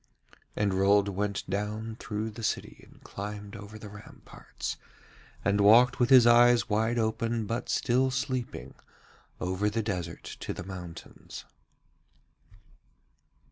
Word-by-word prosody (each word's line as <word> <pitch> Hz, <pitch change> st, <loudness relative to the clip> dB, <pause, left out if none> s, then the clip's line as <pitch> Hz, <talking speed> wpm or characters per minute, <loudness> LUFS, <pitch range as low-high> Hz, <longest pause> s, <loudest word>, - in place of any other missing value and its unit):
And 100 Hz, -2 st, +1 dB
Rold 100 Hz, +1 st, +3 dB
went 100 Hz, +1 st, -3 dB
down 105 Hz, +3 st, -3 dB
through 105 Hz, +1 st, -4 dB
the 115 Hz, +2 st, -9 dB
city 110 Hz, -, -3 dB
and -, -, -21 dB
climbed 105 Hz, 0 st, -7 dB
over 105 Hz, +2 st, -9 dB
the 110 Hz, -, -10 dB
ramparts, 105 Hz, +1 st, -8 dB, 0.7 s
and 100 Hz, 0 st, +2 dB
walked 120 Hz, +6 st, +6 dB
with 120 Hz, -1 st, +3 dB
his 130 Hz, -3 st, +8 dB
eyes 120 Hz, 0 st, +6 dB
wide 110 Hz, +2 st, +1 dB
open 115 Hz, 0 st, -1 dB
but 115 Hz, +3 st, -4 dB
still 130 Hz, +1 st, +2 dB
sleeping 125 Hz, -, -3 dB, 0.7 s
over 95 Hz, +3 st, 0 dB
the 110 Hz, +1 st, -2 dB
desert 90 Hz, -6 st, -4 dB, 0.2 s
to -, -, -4 dB
the -, -, -6 dB
mountains. 90 Hz, -3 st, -9 dB
105 Hz, 125 wpm, -28 LUFS, 100-115 Hz, 0.7 s, his